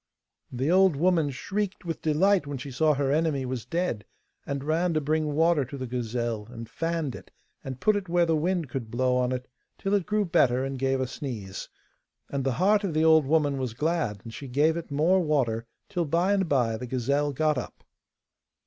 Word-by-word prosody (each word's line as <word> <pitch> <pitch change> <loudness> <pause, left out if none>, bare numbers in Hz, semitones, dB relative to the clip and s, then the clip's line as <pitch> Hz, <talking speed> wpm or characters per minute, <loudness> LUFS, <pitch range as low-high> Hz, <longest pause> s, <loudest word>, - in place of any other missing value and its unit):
The 130 +6 0
old 190 -3 +5
woman 165 -1 +2
shrieked 195 +8 -3
with 165 -1 -4
delight 170 +2 +2
when 140 -1 -4
she 140 +2 -7
saw 155 +3 +2
her 135 -1 0
enemy 150 -3 +1
was 125 -3 -4
dead, 165 - -2 0.4
and 140 -1 -3
ran 165 +3 +1
to - - +3
bring 155 0 0
water 165 -1 +3
to 140 +3 -8
the 130 - -4
gazelle, 120 -3 -3
and 115 -2 -8
fanned 165 -3 -2
it, - - -11 0.3
and 130 -1 -6
put 215 +7 +3
it 195 -3 -3
where 175 0 +3
the 165 -1 +2
wind 170 +1 0
could 120 -3 -5
blow 125 +2 +1
on 125 0 +1
it, 125 0 -3 0.3
till 195 - -2
it 200 -4 +1
grew 210 0 +1
better 135 -7 +2
and 135 -1 -4
gave 135 0 +1
a 130 - 0
sneeze. 120 -7 -6 0.6
And 140 -1 -1
the 135 -1 0
heart 205 - +3
of 180 -6 -2
the 155 +1 +3
old 160 -3 +5
woman 145 -2 +2
was 125 -4 -3
glad, 150 - -1
and 115 - -9
she 140 - -7
gave 150 +5 +2
it 170 - -5
more 160 +7 +3
water, 125 -9 0 0.2
till 175 -1 -1
by 170 +6 +2
and 190 -4 +1
by 120 -5 +2
the 125 +2 -6
gazelle 140 +4 0
got 150 0 +1
up. 120 - -9
145 Hz, 210 wpm, -27 LUFS, 125-170 Hz, 0.6 s, old